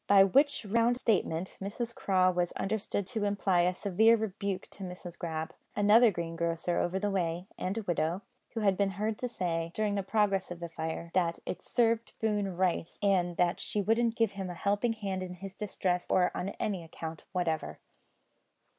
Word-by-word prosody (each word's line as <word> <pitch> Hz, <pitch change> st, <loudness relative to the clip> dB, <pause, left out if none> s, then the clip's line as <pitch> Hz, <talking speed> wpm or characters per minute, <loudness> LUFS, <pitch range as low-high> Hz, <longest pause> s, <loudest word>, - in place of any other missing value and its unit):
By 200 Hz, -1 st, +8 dB
which 275 Hz, +5 st, +3 dB
round 230 Hz, +4 st, +2 dB
statement, 190 Hz, -7 st, 0 dB
Mrs 230 Hz, +4 st, -3 dB
Craw 185 Hz, -4 st, +3 dB
was 175 Hz, -1 st, 0 dB
understood 205 Hz, 0 st, -2 dB
to 220 Hz, +1 st, -2 dB
imply 200 Hz, -3 st, +2 dB
a 180 Hz, +1 st, +2 dB
severe 220 Hz, +5 st, +4 dB
rebuke 200 Hz, -3 st, -3 dB
to 195 Hz, -, -8 dB
Mrs 180 Hz, -1 st, -7 dB
Grab 160 Hz, -2 st, -4 dB, 0.2 s
another 215 Hz, +3 st, +6 dB
greengrocer 170 Hz, -1 st, -1 dB
over 180 Hz, +2 st, 0 dB
the 205 Hz, +1 st, 0 dB
way 175 Hz, -2 st, -1 dB
(and 190 Hz, +4 st, -3 dB
a 225 Hz, -, -2 dB
widow) 175 Hz, +1 st, -1 dB, 0.3 s
who 225 Hz, -, -1 dB
had 195 Hz, -2 st, +3 dB
been 200 Hz, +1 st, +2 dB
heard 215 Hz, +1 st, -1 dB
to 250 Hz, -, -1 dB
say, 170 Hz, -7 st, -2 dB
during 215 Hz, -1 st, +1 dB
the 200 Hz, -, 0 dB
progress 195 Hz, -1 st, +1 dB
of 175 Hz, -1 st, -6 dB
the 170 Hz, -1 st, -5 dB
fire, 160 Hz, +1 st, -4 dB
that 170 Hz, -2 st, +1 dB
it -, -, -4 dB
served 230 Hz, -1 st, +1 dB
Boone 205 Hz, -4 st, 0 dB
right, 180 Hz, -3 st, 0 dB
and 180 Hz, -3 st, +2 dB
that 175 Hz, 0 st, +2 dB
she 210 Hz, -, -2 dB
wouldn't 225 Hz, +3 st, +2 dB
give 225 Hz, -3 st, +2 dB
him 195 Hz, -2 st, -5 dB
a 175 Hz, -, -5 dB
helping 205 Hz, +6 st, +1 dB
hand 195 Hz, -4 st, -3 dB
in 180 Hz, -1 st, -5 dB
his 190 Hz, +2 st, -8 dB
distress 185 Hz, -3 st, -1 dB
on 180 Hz, +1 st, +1 dB
any 195 Hz, -5 st, -1 dB
account 160 Hz, 0 st, -7 dB
whatever. 175 Hz, -4 st, -1 dB
195 Hz, 180 wpm, -31 LUFS, 175-210 Hz, 0.3 s, By